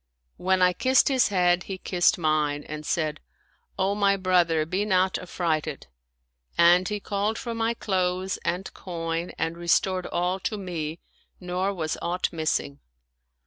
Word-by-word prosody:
When 185 0 +2
I 180 0 +5
kissed 260 +7 +3
his 260 -2 +3
head, 180 -2 +2
he 195 - -5
kissed 180 -1 +2
mine 155 -3 0
and 155 0 -7
said, 155 -3 -1 0.3
" - - -41
O 190 +1 +1
my 200 -1 +2
brother, 175 -4 +2
be 185 +5 -1
not 185 -2 +2
affrighted 170 -4 -2 0.4
"; - - -52 0.3
and 175 +2 +6
he 210 -1 -2
called 205 +2 -1
for 235 -2 -4
my 230 +1 0
clothes 185 -2 -1
and 180 +3 -2
coin 165 -1 -4
and 165 0 -1
restored 185 +2 +1
all 180 +2 -1
to 215 +3 -3
me 165 -4 -4 0.4
nor 180 +2 -1
was 160 -5 -3
aught 180 +1 -1
missing. 155 -3 -1
180 Hz, 155 wpm, -26 LUFS, 165-190 Hz, 0.4 s, and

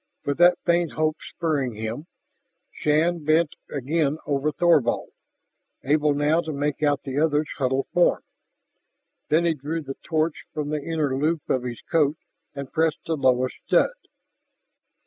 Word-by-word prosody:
With 140 +2 -1
that 175 0 +6
faint 170 -2 +2
hope 155 0 0
spurring 145 -7 -2
him, 110 +8 -5 0.6
Shann 160 +2 +1
bent 155 +1 +3 0.2
again 150 +2 0
over 145 +1 0
Thorvald, 160 -8 +2 0.7
able 150 +1 +2
now 150 +3 +2
to 160 - -5
make 145 0 -2
out 145 -2 +1
the 135 +1 -2
other's 150 -1 +2
huddled 135 0 +1
form. 175 - +3 1.1
Then 165 +3 +3
he 170 - +3
drew 155 +3 -4
the 135 -1 -7
torch 160 -1 -1
from 150 -1 -2
the 150 -1 -2
inner 150 -4 -1
loop 155 +3 -1
of 130 - +1
his 120 -1 -6
coat 155 -2 +1 0.4
and 140 -2 -7
pressed 160 -1 0
the 165 - -1
lowest 130 -3 +1
stud. - - +3
150 Hz, 145 wpm, -24 LUFS, 140-160 Hz, 1.1 s, that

